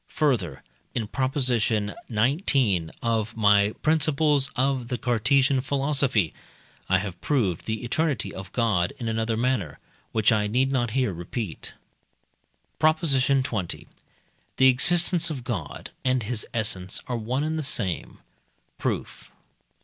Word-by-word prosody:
Further 115 - 0 0.3
(in 115 - -1
Prop. 130 +4 -2
xix. 125 -6 +2 1.3
of 115 -1 -1
my 105 -1 +4
"Principles 150 -2 +2
of 130 -2 0
the 125 - -2
Cartesian 130 +3 +2
Philosophy"), 135 - +1 0.6
I 95 - +5
have 95 -2 -5
proved 105 - 0
the 110 0 -2
eternity 130 -4 -1
of 95 -1 -8
God, 105 -8 +1
in 115 - -5
another 110 0 -1
manner, 115 - -1 0.3
which 110 +1 +3
I 105 -2 +2
need 130 +5 +1
not 120 -3 +1
here 125 -7 +1
repeat. 85 +2 -5 1.0
PROP. 155 0 +4
XX. 130 - 0 0.7
The 130 +1 +7
existence 170 +5 +3
of 135 -6 -5
God 100 - -5
and 130 -2 +1
his 110 0 -3
essence 95 -5 -1
are 125 - -3
one 120 +5 -1
and 160 +1 -1
the - - -1
same. 115 - -2 0.6
Proof. - - -4
120 Hz, 125 wpm, -25 LUFS, 105-135 Hz, 1.3 s, The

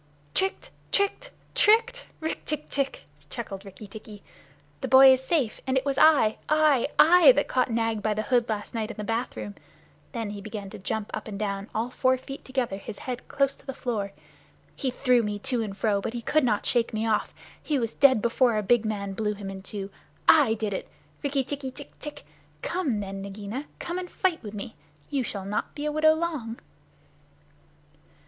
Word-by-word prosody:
"Tricked! 385 0 -1 0.2
Tricked! 400 +5 +1 0.2
Tricked! 480 +1 +4 0.2
Rikk 320 - -3
tck 305 0 -2
tck!" 275 -1 -1 0.3
chuckled 200 -5 -6
Rikki 200 +1 -11
tikki. 210 0 -11 0.6
"The - - -2
boy 265 0 +9
is 260 0 -1
safe, 265 -7 0
and 260 0 +2
it 260 - 0
was 275 -1 0
I 275 -9 +5
I 305 -5 +4
I 350 - +8
that - - +1
caught 255 -1 +1
Nag 225 -2 0
by 215 0 0
the 215 - -1
hood 240 -2 +2
last 210 -1 -3
night 225 -1 -2
in 230 - -7
the 210 - -4
bathroom." 225 -1 -3 0.6
Then 225 -5 -3
he 205 -1 -7
began 205 -2 -7
to - - -8
jump 205 +3 -3
up - - -4
and 205 -2 -5
down, 200 -1 -3
all 230 +3 -1
four 260 0 +2
feet 270 +2 -9
together, 255 -7 -2
his 200 +1 -8
head 250 -1 -6
close 275 -1 +1
to - - -21
the 270 - -4
floor. 210 -5 -2 0.6
"He 265 - -1
threw 250 -1 +3
me 210 -2 -2
to 240 +3 -1
and 200 -3 -4
fro, 205 -3 +1
but 220 - -4
he 240 -1 -5
could 310 +4 +2
not 215 -5 +1
shake 235 -2 +1
me 220 +1 0
off. 220 -2 +1 0.3
He 300 - 0
was 230 -3 -1
dead 260 -6 +5
before 235 0 +3
the 215 - 0
big 240 +2 +3
man 200 -2 -2
blew 210 +1 -1
him 200 -1 -6
in 190 0 -8
two. 195 0 -6 0.4
I 275 -8 +6
did 215 -2 -2
it! - - -5 0.3
Rikki 280 -1 +1
tikki 275 0 -4
tck 280 +2 -10
tck! 295 -1 -8 0.4
Come 290 - -1
then, 195 0 -5
Nagaina. 205 +7 -6
Come 345 +1 -4
and 360 -1 -6
fight 365 -4 0
with 210 -2 -8
me. 210 +2 -6 0.4
You 275 - +1
shall 200 -5 -5
not 205 +2 -3
be 295 - -4
a 300 - 0
widow 315 +1 +4
long." 305 -9 -3
235 Hz, 200 wpm, -27 LUFS, 210-280 Hz, 0.6 s, boy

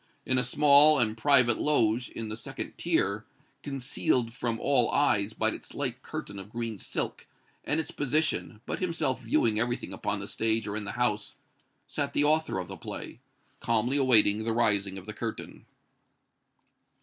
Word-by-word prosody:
In 130 0 +2
a - - +2
small 145 +3 +6
and 110 -4 +1
private 125 -1 +4
loge 120 -5 +1
in 115 -1 -6
the 110 - -4
second 115 - -7
tier, 100 +3 0 0.4
concealed 130 -3 -1
from 115 -2 -3
all 130 -4 +3
eyes 110 -7 +1
by - - +1
its - - -8
light - - -3
curtain 100 -1 -7
of 95 +1 -9
green 115 -2 -5
silk, - - -3 0.4
and 150 - +1
its 160 - -3
position, 145 -6 -1
but - - -4
himself 160 -8 -1
viewing 115 -2 +1
everything 120 +2 -2
upon 100 0 -3
the 100 - -6
stage 110 +2 0
or 100 - -4
in 110 -1 -3
the - - -5
house, 105 -4 -1 0.5
sat - - -3
the 145 - +2
author 155 -5 +1
of 90 -2 -4
the - - -8
play, - - -7 0.4
calmly 115 +4 0
awaiting 110 -5 +5
the 115 0 -1
rising 100 -4 +1
of 95 - -9
the 110 - -7
curtain. 115 +1 -7
115 Hz, 170 wpm, -28 LUFS, 110-135 Hz, 0.5 s, small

